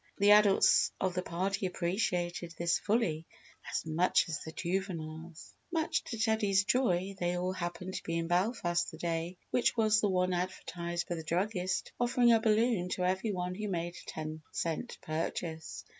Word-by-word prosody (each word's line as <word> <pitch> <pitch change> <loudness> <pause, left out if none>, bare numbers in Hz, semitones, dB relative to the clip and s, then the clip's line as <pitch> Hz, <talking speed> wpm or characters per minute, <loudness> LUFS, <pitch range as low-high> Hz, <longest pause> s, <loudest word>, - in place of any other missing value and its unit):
The 200 +1 +5
adults 210 -2 +6
of 185 -1 0
the 180 - -1
party 190 +3 -1
appreciated 175 -2 -2
this 170 0 +1
fully 190 -8 0 0.4
as - - -2
much 160 +4 +2
as 155 - -2
the 160 - -7
juveniles. 165 -3 -4 0.2
Much 325 -1 0
to 230 - -5
Teddy's 215 -3 +2
joy, 200 -5 +1
they 175 0 0
all 180 +1 -1
happened 180 +1 -4
to - - -3
be 165 0 -2
in 165 - -1
Belfast 175 -1 +1
the - - -10
day 170 +1 -2
which 245 -1 +2
was 215 -1 +4
the 205 - +2
one 185 -1 +1
advertised 175 -1 -3
by - - -2
the 165 -2 -5
druggist 185 +3 -1
offering 240 0 +4
a 225 - +4
balloon 220 -4 +2
to 180 0 -1
every 190 +4 0
one 180 -1 -2
who 210 +3 -4
made 175 -2 -3
a - - -10
ten 155 0 -5
cent 165 +9 -3
purchase. 160 0 -4
180 Hz, 175 wpm, -32 LUFS, 170-205 Hz, 0.4 s, adults